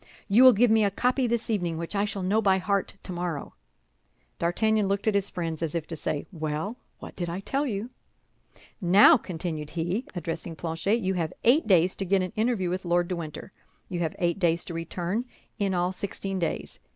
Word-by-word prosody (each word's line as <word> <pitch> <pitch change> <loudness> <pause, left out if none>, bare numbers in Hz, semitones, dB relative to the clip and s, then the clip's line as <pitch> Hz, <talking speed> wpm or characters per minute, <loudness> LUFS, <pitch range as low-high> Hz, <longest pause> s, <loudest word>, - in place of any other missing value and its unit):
"You 220 +5 +6
will 255 -1 +10
give 230 +2 +4
me 220 -1 +5
a 200 - +3
copy 250 +5 +1
this 235 0 -1
evening, 175 -6 -1
which 170 +4 -5
I 200 +1 +2
shall 200 -2 -4
know 205 +4 +2
by 195 -2 +4
heart 200 +1 -1
tomorrow." 175 -5 -4 0.9
D'Artagnan 210 +5 +2
looked 200 0 -1
at 215 - +4
his 200 0 +1
friends, 165 -2 -4
as 165 -1 -2
if 165 -2 -1
to 165 - -6
say, 150 -1 -2
"Well, 160 +6 -3 0.2
what - - -10
did 175 -2 -3
I 175 +2 -3
tell 275 +8 -1
you?" 210 -1 -3 0.9
"Now," 195 - +7
continued 165 - -4
he, 175 +9 -2
addressing 165 -1 -4
Planchet, 170 +8 -1
"you 190 -1 0
have 165 -4 -2
eight 260 +5 +4
days 185 -2 +4
to 195 - -2
get 190 0 +2
an 185 - -5
interview 215 -5 0
with 185 +1 -2
Lord 175 0 +1
de 180 - -1
Winter; 165 +2 -7 0.4
you 175 - -3
have 165 -2 -1
eight 175 +1 0
days 170 -2 +1
to 175 - -6
return—in 190 +4 -4
all 180 +1 +1
sixteen 195 0 -4
days. 170 - -3
185 Hz, 200 wpm, -27 LUFS, 170-205 Hz, 0.9 s, will